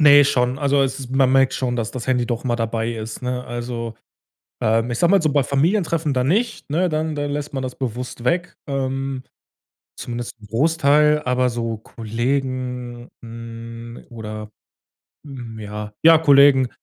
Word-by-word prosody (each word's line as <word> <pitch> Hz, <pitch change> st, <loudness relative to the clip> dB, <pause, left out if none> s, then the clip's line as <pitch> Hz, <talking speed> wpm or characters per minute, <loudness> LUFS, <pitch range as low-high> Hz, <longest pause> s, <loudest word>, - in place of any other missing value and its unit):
Ne 145 Hz, -1 st, +8 dB
schon, 125 Hz, -1 st, +1 dB
also 140 Hz, -1 st, +3 dB
es 135 Hz, -1 st, -3 dB
man 135 Hz, -1 st, +3 dB
merkt 135 Hz, 0 st, +4 dB
schon, 125 Hz, -2 st, -1 dB
dass 115 Hz, -3 st, -2 dB
das 125 Hz, -1 st, -5 dB
Handy 125 Hz, -2 st, +2 dB
doch 120 Hz, 0 st, -3 dB
immer 120 Hz, -2 st, 0 dB
dabei 115 Hz, 0 st, -1 dB
ist, 110 Hz, +1 st, -6 dB
ne, 125 Hz, 0 st, -2 dB
also, 120 Hz, -1 st, -5 dB, 0.7 s
ähm, 115 Hz, +2 st, +2 dB
ich 120 Hz, -, -2 dB
sage 175 Hz, -, +4 dB
mal 195 Hz, -3 st, +5 dB
so, 155 Hz, -2 st, +1 dB
bei 140 Hz, -2 st, +3 dB
Familientreffen 160 Hz, -, +1 dB
dann 125 Hz, 0 st, +1 dB
nicht, 220 Hz, -, 0 dB
ne, 175 Hz, +5 st, +1 dB
dann 155 Hz, 0 st, -1 dB
dann 145 Hz, 0 st, -2 dB
lässt 145 Hz, 0 st, -4 dB
man 135 Hz, -, -2 dB
das 125 Hz, -1 st, -5 dB
bewusst 125 Hz, -1 st, -5 dB
weg, 175 Hz, +5 st, 0 dB
ähm, 135 Hz, -1 st, -2 dB, 0.7 s
zumindest 120 Hz, 0 st, -5 dB
'n 105 Hz, -, -14 dB
Großteil, 150 Hz, +4 st, +3 dB
aber 125 Hz, 0 st, +2 dB
so 115 Hz, -1 st, -3 dB
Kollegen, 125 Hz, +1 st, -3 dB
hm, 115 Hz, 0 st, -9 dB
oder, 110 Hz, -2 st, -7 dB, 0.8 s
hm 120 Hz, -5 st, -8 dB
ja 105 Hz, 0 st, -6 dB
ja 165 Hz, 0 st, +8 dB
Kollegen, 140 Hz, -4 st, +6 dB
130 Hz, 165 wpm, -21 LUFS, 115-145 Hz, 0.8 s, Ne